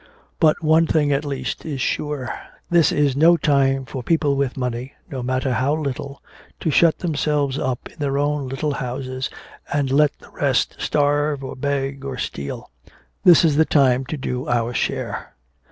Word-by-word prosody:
But 160 -1 +3
one 160 +1 +4
thing 150 -3 +2
at 140 +1 +1
least 140 -2 -4
is 145 -4 -4
sure. 140 0 -2 0.4
This 170 -4 +5
is 145 -3 +2
no 165 +4 +6
time 135 -3 +2
for 135 -1 -6
people 145 +1 +1
with 140 -1 -1
money 125 +1 -3 0.2
no 130 -2 -4
matter 130 +1 -1
how 130 +5 +1
little 140 -2 -5 0.4
to 160 - 0
shut 165 +2 +4
themselves 145 -4 0
up 125 -2 -2
in - - -20
their 140 -1 0
own 145 -1 0
little 145 +3 -2
houses 130 0 -4 0.4
and 140 -2 0
let 150 +1 +3
the - - -18
rest - - 0
starve 145 -1 +1
or 130 - -6
beg 135 0 -2
or 135 -2 -5
steal. 70 - -5 0.5
This 175 -1 +7
is 150 -3 +2
the 160 - +6
time 135 -4 +3
to 150 +3 -4
do 125 -2 -4
our 120 0 0
share." - - -3
140 Hz, 170 wpm, -21 LUFS, 130-150 Hz, 0.5 s, This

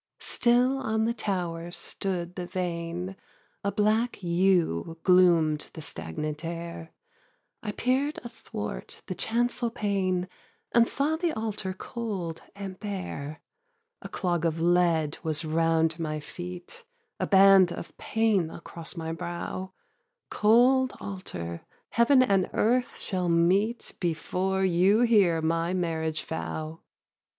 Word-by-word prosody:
Still 250 +3 +2
on 220 -3 0
the 230 - +1
tower 175 -6 -3
stood 175 0 -3
the 180 -1 -5
vane, 175 +1 -3 0.5
A 200 - 0
black 220 +4 +1
yew 170 - +2
gloom'd 170 -5 +4
the 160 - -7
stagnant 150 - -5
air, 170 0 -6 0.7
I 210 - -3
peer'd 265 +7 0
athwart 105 - -6
the - - -4
chancel 235 +5 0
pane 190 -4 0 0.4
And 235 -1 +4
saw 300 +4 +1
the 340 0 0
altar 210 -4 -3
cold 190 -7 -4
and 195 -2 -7
bare. 180 -7 -5 0.6
A - - -8
clog 175 -3 -1
of 165 -1 0
lead 170 -3 +2
was 155 0 -2
round 165 +1 +2
my 155 -2 -2
feet, 180 - -8 0.4
A - - 0
band 195 -2 +7
of - - -7
pain 215 -7 +1
across 170 +1 -8
my 160 0 -3
brow; 175 +3 -5 0.6
'Cold 250 +4 +4
altar, 85 - -6 0.3
Heaven 255 +3 +5
and 195 -6 +2
earth 245 +3 +1
shall 185 -3 -1
meet 190 +8 +2
Before 185 +3 0
you 190 +5 +4
hear 200 -9 +4
my 165 +2 +1
marriage 160 -3 -1
vow.' 160 0 -4
2. - - -44
180 Hz, 125 wpm, -27 LUFS, 165-215 Hz, 0.7 s, band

